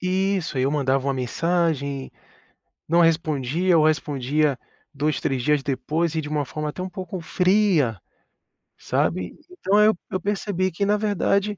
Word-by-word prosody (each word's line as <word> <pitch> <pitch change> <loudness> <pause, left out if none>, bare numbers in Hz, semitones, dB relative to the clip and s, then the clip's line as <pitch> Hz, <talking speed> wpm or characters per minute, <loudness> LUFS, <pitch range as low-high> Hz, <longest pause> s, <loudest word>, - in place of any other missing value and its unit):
Isso, 185 -5 0
eu 130 +2 +2
mandava 135 -2 0
uma 135 - +1
mensagem, 140 0 -1 0.7
não 170 +2 +3
respondia 165 +1 +2
ou 155 - +4
respondia 145 -1 0 0.3
2, 150 +2 -1
3 130 -3 -1
dias 150 0 +2
depois 150 +5 -1
e 160 - 0
de 150 - -6
uma 150 -1 -1
forma 150 +3 -4
até 180 - -5
um 185 - -5
pouco 185 0 -6
fria, 180 - +2 0.8
sabe. 90 -1 -1
Então 210 - +1
eu 215 -3 +4
eu 185 - -1
percebi 190 -1 -1
que, 200 +5 -1
na 210 +1 +2
verdade, 205 0 0
160 Hz, 150 wpm, -23 LUFS, 140-185 Hz, 0.8 s, ou